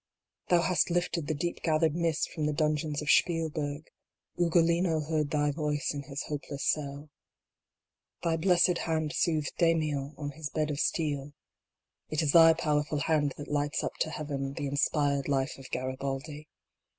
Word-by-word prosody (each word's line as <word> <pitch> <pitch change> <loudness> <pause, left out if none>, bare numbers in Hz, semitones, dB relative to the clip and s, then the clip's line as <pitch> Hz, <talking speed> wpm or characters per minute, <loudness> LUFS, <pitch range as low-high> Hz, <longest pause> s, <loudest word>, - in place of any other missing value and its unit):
Thou 175 -1 +4
hast 180 -1 +2
lifted 175 -3 -1
the 155 - -1
deep 170 +4 -3
gathered 160 -1 +2
mist 165 -3 0
from 150 -2 -2
the 150 - 0
dungeons 150 -1 0
of 150 - +3
Spielberg; 155 -3 +1 0.5
Ugolino 170 -1 +2
heard 155 -1 -1
thy 145 -1 +1
voice 150 -1 -1
in 145 - -4
his 140 0 -5
hopeless 145 -1 -5
cell: 145 0 -5 1.1
Thy 165 -1 +2
blessed 175 +1 +3
hand 160 -1 -1
soothed 155 -3 0
Damiens 155 -4 +1
on 145 -1 -4
his 145 +1 -6
bed 155 0 -1
of 145 - -3
steel; 145 -4 -1 0.8
It 155 +1 0
is 145 - +2
thy 165 0 +8
powerful 150 -2 0
hand 150 -4 +1
that 145 - -7
lights 145 0 0
up - - -2
to 160 - +1
Heaven 140 -3 -4
the 145 - -4
in 140 0 -3
spired 145 -2 +1
life 135 -1 -1
of 135 - -11
Garabaldi. 135 +4 -4
150 Hz, 160 wpm, -29 LUFS, 145-165 Hz, 1.1 s, thy